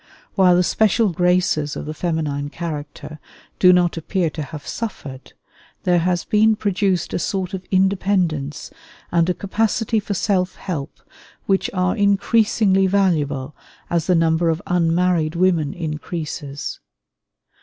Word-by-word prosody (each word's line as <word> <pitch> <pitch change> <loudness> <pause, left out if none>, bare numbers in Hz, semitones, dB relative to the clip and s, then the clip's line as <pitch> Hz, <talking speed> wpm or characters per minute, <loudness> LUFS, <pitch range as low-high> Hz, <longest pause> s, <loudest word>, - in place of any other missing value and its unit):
While 185 -3 +5
the 180 - +3
special 220 +3 +2
graces 175 -4 +1
of - - -5
the 155 - -5
feminine 155 -4 -2
character 150 -2 -7 0.4
do 180 - +7
not 175 -1 +2
appear 165 0 -1
to 155 - -5
have 150 0 -8
suffered, 140 - -6 0.5
there 175 -1 +3
has 175 +1 0
been 220 0 +3
produced 195 -4 0
a - - 0
sort 190 0 -2
of 190 -1 -6
independence 185 -6 0 0.4
and 170 0 +2
a 180 - 0
capacity 220 +2 0
for 205 -1 -4
self 185 -2 0
help 155 -7 -6 0.4
which 195 -1 +1
are 180 -1 0
increasingly 200 -1 +2
valuable 150 -8 0 0.4
as 170 -2 0
the 180 - +4
number 165 0 +2
of 160 0 0
unmarried 170 -2 +1
women 170 -4 +2
increases. 150 -3 -5
180 Hz, 135 wpm, -21 LUFS, 155-195 Hz, 0.5 s, do